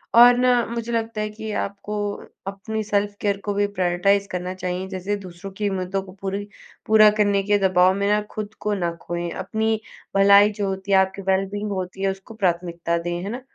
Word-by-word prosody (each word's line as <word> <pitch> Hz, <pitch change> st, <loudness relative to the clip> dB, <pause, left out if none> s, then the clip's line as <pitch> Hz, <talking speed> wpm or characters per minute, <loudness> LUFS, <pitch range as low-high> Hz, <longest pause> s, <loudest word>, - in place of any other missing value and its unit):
और 245 Hz, +1 st, +9 dB
ना 245 Hz, -2 st, +3 dB
मुझे 235 Hz, 0 st, -4 dB
लगता 225 Hz, -1 st, -2 dB
है 215 Hz, -, -2 dB
कि 220 Hz, +1 st, -7 dB
आपको 200 Hz, +1 st, -5 dB, 0.5 s
अपनी 215 Hz, +3 st, -4 dB
सेल्फ़ 205 Hz, -1 st, 0 dB
केयर 200 Hz, -1 st, +1 dB
को 205 Hz, -, 0 dB
भी 205 Hz, +1 st, +2 dB
प्रायोरिटाइज़ 195 Hz, +1 st, +1 dB
करना 180 Hz, -1 st, -4 dB
चाहिए, 185 Hz, 0 st, -4 dB
जैसे 190 Hz, +2 st, -2 dB
दूसरों 185 Hz, 0 st, -9 dB
की 210 Hz, -1 st, 0 dB
मदों 190 Hz, 0 st, -2 dB
को 185 Hz, -, -12 dB
पूरी 195 Hz, +1 st, -3 dB, 0.4 s
पूरा 215 Hz, -1 st, +7 dB
करने 200 Hz, -1 st, +3 dB
के 205 Hz, +1 st, +3 dB
दबाव 185 Hz, 0 st, +4 dB
में 200 Hz, 0 st, 0 dB
ना 210 Hz, -, +3 dB
खुद 215 Hz, 0 st, -5 dB
को 210 Hz, 0 st, -1 dB
ना 175 Hz, -4 st, -1 dB
खोएँ, 175 Hz, 0 st, -3 dB
अपनी 220 Hz, +5 st, -1 dB, 0.4 s
भलाई 200 Hz, +1 st, +7 dB
जो 205 Hz, -1 st, -3 dB
होती 190 Hz, +1 st, -4 dB
है, 195 Hz, -, +6 dB
आपकी 190 Hz, +1 st, +1 dB
वेल-बीइंग 195 Hz, +2 st, -1 dB
होती 185 Hz, 0 st, -4 dB
है 195 Hz, -, +3 dB
उसको 195 Hz, +3 st, -10 dB
प्राथमिकता 170 Hz, -4 st, -1 dB
दें, 175 Hz, +1 st, -3 dB
है 200 Hz, -, -4 dB
ना? 245 Hz, +4 st, -5 dB
200 Hz, 200 wpm, -23 LUFS, 185-210 Hz, 0.5 s, और